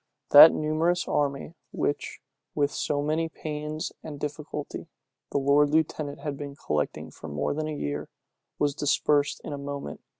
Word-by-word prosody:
That 145 +3 +11
numerous 160 +4 0
army, 145 +1 -1 0.2
which, 145 - -2 0.3
with 145 -1 +2
so 145 -1 -1
much 160 +2 0
pains 150 0 -4
and 150 -3 -8
difficulty, 150 0 -5 0.4
the - - 0
lord 140 +1 +4
lieutenant 155 -1 0
had 145 -2 -4
been 140 -1 -6
collecting 75 - -2
for - - -10
more 75 -1 -1
than 155 +1 -2
a 155 - -3
year, 75 - -3 0.5
was 145 -1 +1
dispersed 145 0 +1
in - - -5
a 140 - -5
moment. 140 - -6
145 Hz, 155 wpm, -27 LUFS, 140-155 Hz, 0.5 s, That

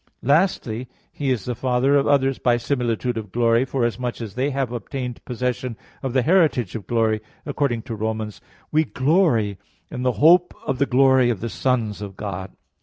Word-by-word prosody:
Lastly, 135 - +1 0.2
He 140 -2 -3
is 120 -7 -1
the 125 - -2
Father 130 +3 +1
of 140 0 +3
others 135 -2 +2
by 120 -1 +2
similitude 120 -2 -1
of 105 -4 -9
glory, 115 +2 +3
forasmuch 125 -1 -2
as 110 -5 -6
they 130 +5 0
have 135 -3 -2
obtained 125 +1 -5
possession 125 -1 -3 0.2
of 135 -3 -3
the 130 -2 +3
heritage 150 - +2
of 105 -5 -6
glory, 110 -2 +1 0.2
according 140 -6 -1
to 125 - -6
Rom. 110 0 -2
5:2: 110 -2 -6 0.3
"We 155 +1 +3
glory 130 - +2 0.3
in 125 - -5
the 125 -1 +1
hope 170 - +5
of 130 -1 -2
the 140 - +2
glory 130 -1 +4
of 115 -5 -1
the 115 - -4
sons 115 -5 -1
of 100 -2 -7
God." 95 -2 -5
125 Hz, 180 wpm, -22 LUFS, 115-135 Hz, 0.3 s, hope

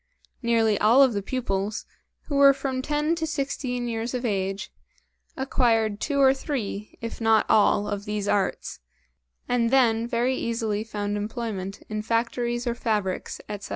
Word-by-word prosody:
Nearly 225 -3 +2
all 235 +6 +6
of 260 -3 +3
the 200 - -1
pupils, 205 -3 -2 0.4
who - - -7
were 275 -1 +7
from 260 -2 -2
ten 300 +3 0
to 325 -1 -2
sixteen 270 -5 -2
years 230 +2 -3
of 250 0 -3
age, 195 -2 -2 0.7
acquired 225 -5 +1
two 285 +3 -1
or 265 -1 +6
three, 230 -7 -4
if 230 0 -6
not 225 -1 +4
all, 205 -1 +4
of 205 -1 -4
these 210 -1 -3
arts, 200 -2 -1 0.7
and 235 -2 +2
then 235 -3 +3
very 240 +2 +1
easily 225 -4 -2
found 205 -2 -3
employment 205 -3 -4
in 215 0 -3
factories 235 +2 -1
or 240 - 0
fabrics, 210 -6 -2
etc. 205 -1 -6
230 Hz, 155 wpm, -25 LUFS, 210-255 Hz, 0.7 s, were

